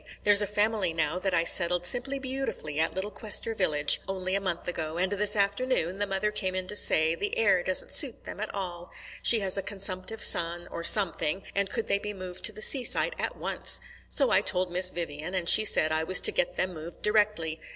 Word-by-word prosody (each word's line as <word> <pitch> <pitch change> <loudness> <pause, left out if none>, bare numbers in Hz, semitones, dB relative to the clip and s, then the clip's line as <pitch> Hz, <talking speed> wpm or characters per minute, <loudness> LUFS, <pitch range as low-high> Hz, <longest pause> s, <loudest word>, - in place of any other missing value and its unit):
There's 205 0 +6
a 205 - -1
family 210 -3 -1
now 160 +2 -2
that 190 +1 -3
I 165 - +1
settled 175 +1 +2
simply 255 +8 0
beautifully 260 - -5
at 160 - -1
Little 195 +2 -4
Quester 220 +2 -2
village 150 -8 +2
only 185 -1 -5
a 195 - -1
month 180 -3 -4
ago, 160 -2 -4
and 185 +2 -1
this 205 +1 +2
afternoon 200 -2 -1
the 205 - -1
mother 195 +2 -2
came 190 -3 -3
in 185 0 -3
to - - -3
say 160 -5 +3
the 205 +5 -5
air 195 -5 +2
doesn't 185 +1 -1
suit 270 -6 +2
them - - -10
at 215 - -5
all 175 -3 -7 0.3
she 230 -2 +5
has 195 0 +2
a - - -3
consumptive 195 +2 -5
son 170 +1 0
or 170 - -7
something 185 -2 +3
and 200 0 -1
could 230 - -4
they 200 - 0
be 210 0 -7
moved 185 -2 -9
to - - +4
the 215 - -4
seaside 275 - +4
at - - -3
once. - - +1 0.3
So - - +3
I - - +4
told 180 -1 -1
Miss 180 +1 +3
Vivian, 170 0 -6
and 180 -2 -3
she 215 - +7
said 155 -6 +4
I 155 0 -1
was 185 +3 +2
to - - +4
get - - -2
them 185 - -2
moved 160 +1 -11
directly. 205 -7 -1
190 Hz, 220 wpm, -26 LUFS, 175-210 Hz, 0.3 s, she